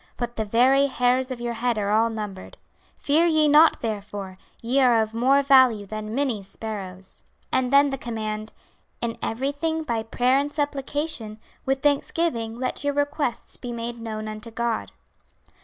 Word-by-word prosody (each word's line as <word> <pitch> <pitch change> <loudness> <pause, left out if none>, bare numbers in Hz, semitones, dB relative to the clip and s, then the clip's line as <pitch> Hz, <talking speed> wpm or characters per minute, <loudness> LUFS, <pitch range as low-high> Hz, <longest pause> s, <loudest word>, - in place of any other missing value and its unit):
But 240 -1 -4
the 220 - -2
very 260 +6 +4
hairs 255 0 +1
of 255 -2 -5
your 240 0 -3
head 235 0 -1
are 205 -1 -1
all 225 +2 +3
numbered. 210 -4 -7 0.4
Fear 315 +4 +3
ye 310 -2 +4
not 305 +2 +6
therefore, 205 -3 -5 0.2
ye 245 +4 0
are 245 -4 +5
of 220 0 -1
more 265 +5 +3
value 260 -6 +5
than 215 +2 -6
many 260 -7 0
sparrows.' 195 -2 -7 0.3
And 255 -1 +1
then 280 0 +5
the 270 - -3
command: 215 -2 -4 0.5
'In 230 -1 -1
everything 285 +7 -2
by 235 -7 -1
prayer 250 +4 +2
and 285 +1 -2
supplication, 290 -5 -2 0.3
with 270 0 0
thanksgiving 285 -5 0
let 255 +3 -3
your 285 0 0
requests 290 -3 -1
be 245 - -6
made 235 0 -5
known 215 -1 -5
unto 215 +2 -7
God.' 230 0 -2
240 Hz, 160 wpm, -24 LUFS, 220-280 Hz, 0.5 s, not